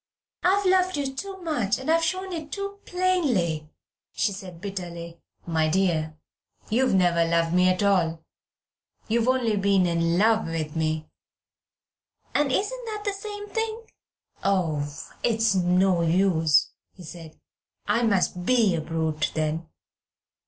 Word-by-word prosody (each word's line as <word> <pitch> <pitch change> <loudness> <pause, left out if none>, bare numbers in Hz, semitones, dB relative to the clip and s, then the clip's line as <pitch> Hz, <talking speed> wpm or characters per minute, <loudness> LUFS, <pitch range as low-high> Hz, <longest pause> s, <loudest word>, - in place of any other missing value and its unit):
"I've 390 +3 +2
loved 370 -2 +3
you 275 -2 -2
too 390 +5 -6
much, 265 - 0
and 265 - -8
I've 330 0 +3
shown 370 +3 -2
it 315 -3 -6
too 400 0 -5
plainly," 255 - 0 0.4
she 205 - 0
said 185 -3 -9
bitterly. 170 -3 -7 0.2
"My 160 -2 +1
dear, 160 -4 0 0.5
you've 250 -1 +2
never 175 -2 +3
loved 165 0 +1
me 180 +1 +4
at 185 +2 +1
all. 165 -5 +1 0.8
You 230 +2 +2
have 230 - 0
only 245 -5 +2
been 195 -2 +3
in 170 0 +1
love 220 +1 +3
with 160 -2 -4
me." 155 -1 -1 1.3
"And 290 -2 +2
isn't 475 - -1
that 425 -2 -5
the 405 - 0
same 410 +1 -7
thing?" 450 +1 -3 0.6
"Oh! 160 -7 0 0.3
it's 225 -2 +2
no 180 0 +3
use," 165 -3 +3 0.2
he 180 - -12
said, 160 -1 -11 0.5
"I 210 +3 +1
must 195 -5 +1
be 225 -2 +3
a 165 - -1
brute 160 -1 -1
then. 155 +1 -2
195 Hz, 140 wpm, -25 LUFS, -, 1.3 s, me